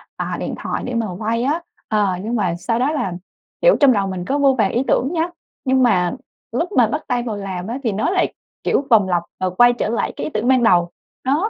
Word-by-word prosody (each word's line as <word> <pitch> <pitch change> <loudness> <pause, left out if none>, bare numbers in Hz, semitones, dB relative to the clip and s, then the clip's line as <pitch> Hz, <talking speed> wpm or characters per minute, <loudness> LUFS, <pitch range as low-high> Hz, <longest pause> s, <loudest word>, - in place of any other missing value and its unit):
à, - - -3
điện - - -3
thoại - - -3
để 250 - -4
mà 230 -1 0
quay 230 +2 -1
á, 300 +6 0 0.3
ờ, 210 -2 +2 0.2
nhưng 230 +3 -2
mà 185 -6 0
sau 230 +6 -1
đó 265 +4 +2
là, 195 - -2 0.5
kiểu, - - +6
trong 280 -3 +6
đầu 200 -3 0
mình 185 -2 -4
có 275 - 0
vô 275 -2 +4
vàn 205 -4 +2
ý 245 - +1
tưởng 265 - +2
nhá, 330 0 +1 0.4
nhưng 260 0 +3
mà 180 -7 +3 0.4
lúc 330 - -1
mà 245 - +4
bắt 300 +8 -2
tay 245 -2 0
vào 225 -3 -3
làm 190 -2 -5
á, 235 +3 -3
thì 230 - +1
nó 215 +11 0
lại, 375 0 +1 0.3
kiểu, 275 - +1
vòng 210 -6 +5
lặp 175 -2 +1 0.2
và 185 - 0
quay 240 +7 +5
trở 240 - -2
lại 230 - -1
cái - - -5
ý - - -3
tưởng 215 +3 -1
ban 255 -2 +4
đầu, 175 -5 +4 0.3
đó. 300 +11 +1
235 Hz, 250 wpm, -20 LUFS, 195-265 Hz, 0.5 s, kiểu